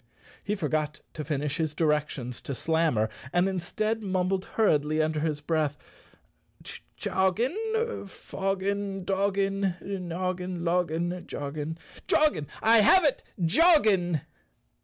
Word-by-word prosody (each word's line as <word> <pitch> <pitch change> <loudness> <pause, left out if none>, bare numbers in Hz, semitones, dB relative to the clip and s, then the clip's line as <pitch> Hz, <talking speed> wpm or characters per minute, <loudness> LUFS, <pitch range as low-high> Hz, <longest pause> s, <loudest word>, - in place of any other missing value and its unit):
He 210 - -1
forgot 155 -4 -2
to 155 - -5
finish 145 0 -2
his 155 -2 -1
directions 150 -6 -1
to 140 - -5
Slammer 160 -8 +1 0.2
and 175 +2 +3
in¬ 190 -2 -2
stead 215 +5 -2
mumbled 190 -1 0
hurriedly 155 -8 +3
under 155 0 +1
his 150 -1 -1
breath, 150 -2 0 0.6
" - - -26 0.4
Choggin, 325 - 0
foggin, 195 0 -3
doggon, 195 -1 0
noggin, 185 -1 -3
loggin, 175 +1 0
joggin. 150 +3 -4 0.3
Ah, 305 - +3 0.2
I 225 +1 +6
have 350 - +6
it 285 -3 +2 0.2
—joggin!" 190 - +4
180 Hz, 115 wpm, -27 LUFS, 155-200 Hz, 0.6 s, I